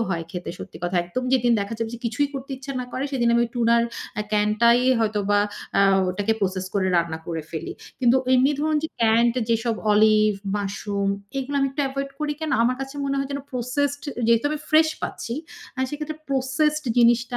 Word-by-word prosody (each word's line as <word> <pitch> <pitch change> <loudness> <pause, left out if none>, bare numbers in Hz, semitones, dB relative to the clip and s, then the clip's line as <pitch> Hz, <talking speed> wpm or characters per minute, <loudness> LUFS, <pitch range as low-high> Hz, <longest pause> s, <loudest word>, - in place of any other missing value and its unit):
হয় 165 -3 -2
খেতে, 180 0 -5
সত্যি 160 - -9
কথা। 175 +1 -1
একদম 250 +9 -4
যেদিন 245 -2 +3
দেখা 200 +3 -3
যাবে 225 -1 -2 0.2
কিছুই 265 +5 0
করতে 275 0 -6
ইচ্ছা 270 +1 -7
না - - -4
করে 260 - -2
সেদিন 240 -3 +1
আমি 235 0 +4
টুনার 235 -1 +3 0.3
অ্যা 210 - -2
ক্যানটাই 215 +3 +4 0.2
হয়তোবা 205 -2 +1 0.4
আ - - +6 0.3
ওটাকে 205 +4 0
আ - - -11
প্রসেস 190 -1 -1
করে 195 -2 +1
রান্না 170 -1 0
করে 165 -2 -3
ফেলি। 160 - -5 0.3
কিন্তু 245 0 +5 0.2
এমনি 260 +2 +4
ধরুন 310 0 +1
যে 320 - -1
ক্যান্ড 230 +1 +4 0.2
যেসব 230 0 +1 0.2
অলিভ, 215 0 +5 0.3
মাশরুম, 200 0 -2 0.3
এগুলা 280 +2 -3
আমি 275 - +2
একটু 285 +2 -2
এভয়েড 275 +1 -4
করি 300 -1 0
কেন? 315 -1 -2
আমার 250 +2 +2
কাছে 270 +1 -6
মনে 275 0 -1
হয় 275 0 -2
যেন 280 - -3
প্রসেসড, 275 +4 -1 0.2
যেহেতু 230 +1 +3
আমি 305 - -2
ফ্রেশ 315 +1 +6
পাচ্ছি 235 - -4 0.4
আ - - -3
সেক্ষেত্রে 300 +1 -5
প্রসেসড 285 +3 +1
জিনিসটা 240 +1 +3
235 Hz, 190 wpm, -23 LUFS, 210-275 Hz, 0.4 s, আ